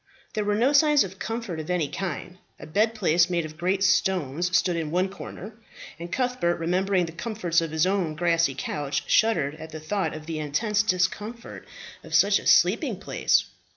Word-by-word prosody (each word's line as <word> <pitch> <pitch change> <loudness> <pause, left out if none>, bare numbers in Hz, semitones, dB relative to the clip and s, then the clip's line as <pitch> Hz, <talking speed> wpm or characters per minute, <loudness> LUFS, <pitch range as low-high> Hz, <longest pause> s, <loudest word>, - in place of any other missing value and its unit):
There 215 - -1
were 205 0 0
no 250 +7 +2
signs 295 0 +5
of 190 0 -9
comfort 225 -7 -4
of 155 - -7
any 175 -4 0
kind; 180 +2 -5 0.2
a - - -9
bed 215 +8 +1
place 175 -4 +3
made 170 -2 0
of 155 0 -9
great 185 +4 0
stones 180 -3 +1
stood 175 0 0
in 160 -2 -3
one 180 +4 0
corner, 200 +2 -9 0.5
and 170 +1 -7
Cuthbert, 250 -9 0
remembering 180 +2 0
the 165 - -7
comforts 175 -2 -1
of 165 - -3
his 160 +2 +1
own 185 -5 0
grassy 165 -4 +1
couch, 145 -1 -3
shuddered 165 -11 +2
at 160 - -8
the 155 - -8
thought 190 +3 -2
of 155 0 -9
the 160 -1 -4
intense 205 +9 0
discomfort 210 +4 -2 0.4
of - - -4
such - - +5
a - - -6
sleeping - - +3
place. - - +1
180 Hz, 190 wpm, -25 LUFS, 160-205 Hz, 0.5 s, signs